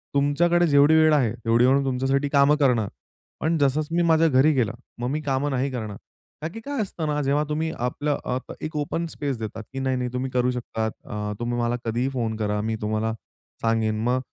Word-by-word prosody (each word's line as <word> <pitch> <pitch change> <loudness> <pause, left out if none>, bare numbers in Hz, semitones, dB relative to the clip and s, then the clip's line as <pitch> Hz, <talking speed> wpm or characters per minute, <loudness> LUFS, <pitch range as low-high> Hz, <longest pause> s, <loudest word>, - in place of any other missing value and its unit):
तुमच्याकडे 170 +5 +3
जेवढी 145 +1 +5
वेळ 155 0 +5
आहे 125 -7 +2
तेवढी 115 +1 +2
वेळ 135 +2 +4
तुमच्यासाठी 135 +2 0
काम 140 +1 +5
करणार, 125 -8 +2 0.5
पण 165 +1 +1
जसचं 150 +3 +1
मी 175 - +3
माझ्या 165 -1 +4
घरी 140 +1 +4
गेला, 120 -5 +1 0.3
मग 120 - -2
मी 155 +1 -1
कामं 140 0 -1
नाही 135 +1 0
करणार. 110 -5 -5 0.4
का 155 - -2
की 225 - -6
काय 280 +2 -3
असतं 175 -6 -3
ना 150 0 0
जेव्हा 145 +2 +2
तुम्ही 160 +1 -1
आपलं 140 +4 -1
अ, 125 - -1
क - - -5
एक 155 0 -5
ओपन 150 +3 -2
स्पेस 140 -5 -3
देतात 110 0 -5
की 135 - -4
नाही-नाही 130 -2 -1
तुम्ही 130 +1 -2
करू 125 0 +2
शकतात. 115 -3 -3
अ, 105 0 -4
तुम्ही 120 0 -2
मला 120 0 +1
कधीही 120 +4 0
फोन 115 -4 -1
करा 105 -1 -1
मी 110 +1 -1
तुम्हाला 110 +1 -1 0.5
सांगेन 110 -1 +1
मग 125 +2 +2
130 Hz, 205 wpm, -24 LUFS, 120-150 Hz, 0.5 s, जेवढी